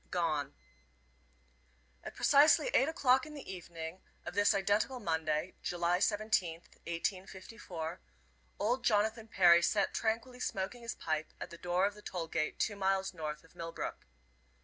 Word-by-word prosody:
GONE. 155 - -1 1.5
At - - -8
precisely 295 - +5
eight 270 - +4
o'clock 265 -3 +3
in 305 - -10
the 285 - -9
evening 170 -1 -7 0.2
of - - -5
this 205 +2 +4
identical 205 +6 +1
Monday, 160 -2 -1
July 175 0 0
17th, 205 -6 +1 0.2
1854, 185 -1 -4 0.6
old 245 +4 0
Jonathan 220 +1 +1
Perry 175 -5 +6
sat 195 +3 +1
tranquilly 230 +3 -1
smoking 200 +1 -3
his 235 0 -4
pipe 155 -1 -2
at - - -7
the 170 - -9
door 180 +2 +1
of 205 - 0
the 210 - -14
toll 180 -4 -4
gate 155 -1 -2
two 205 - 0
miles 195 -1 0
north 155 -3 -5
of 165 - -21
Millbrook. 165 0 -6
190 Hz, 145 wpm, -33 LUFS, 170-220 Hz, 1.5 s, Perry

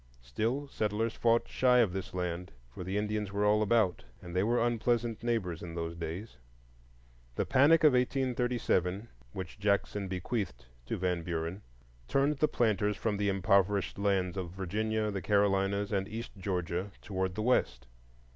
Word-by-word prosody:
Still, 115 - -2
settlers 110 -2 -1
fought 115 0 +2
shy 125 -1 +3
of 110 -7 +3
this 95 -1 -4
land, 90 0 -3 0.2
for 90 - -7
the 95 +3 -2
Indians 105 -1 -1
were 100 +1 0
all 105 +1 +4
about, 105 -4 +2 0.2
and 85 +5 -9
they 90 - +3
were 120 +4 +2
unpleasant 120 -1 0
neighbors 110 -8 -1
in 85 -1 -7
those 85 0 -3
days. 85 - -6 1.0
The - - 0
panic 150 +5 +5
of 150 -3 +7
1837, 120 -6 0 0.2
which 95 +2 -7
Jackson 100 -1 0
bequeathed 90 - -3 0.2
to - - -2
Van 90 -2 0
Buren, 85 +3 -3 0.5
turned 140 - +2
the 155 - +4
planters 105 -5 +1
from 105 -3 -1
the 100 0 +1
impoverished 100 0 +2
lands 95 -2 +1
of 90 -2 -3
Virginia, 105 +4 -1
the 100 -1 -3
Carolinas, 100 0 +2
and 95 -1 0
east 115 +2 -6
Georgia, 95 -1 -2
toward 95 -2 -2
the 110 - -2
West. 65 - +1
100 Hz, 155 wpm, -31 LUFS, 90-115 Hz, 1.0 s, of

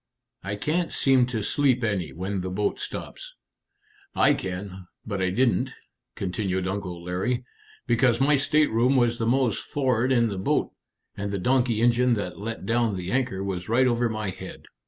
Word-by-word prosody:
I 100 +1 -3
can't 165 +10 -1
seem 130 -2 +3
to 115 -4 -3
sleep 130 0 +2
any 95 -9 -1
when 95 +5 -3
the 95 - -4
boat 100 +3 -1
stops." - - -7 0.8
"I 145 - +5
can, 95 -3 -5 0.2
but 100 -3 -3
I 95 - +2
didn't," 120 +5 +1 0.4
continued 95 -1 -2
Uncle 95 -3 -4
Larry, 110 +8 -2 0.4
"because 120 0 +3
my 145 +2 +4
stateroom 140 -3 +2
was 120 -2 +2
the 115 - 0
most 125 -3 +1
for'ard 130 -3 0
in 120 -3 +3
the 100 -2 -4
boat, 95 - 0 0.4
and 100 0 -4
the 100 - -1
donkey 120 +2 +1
engine 120 +1 +3
that 100 -4 -5
let 110 -1 -5
down 115 -1 +1
the 90 0 -4
anchor 120 -7 0
was 95 -1 -4
right 125 +3 +4
over 120 -1 +2
my 110 -3 -3
head." - - -10
115 Hz, 170 wpm, -25 LUFS, 95-125 Hz, 0.8 s, I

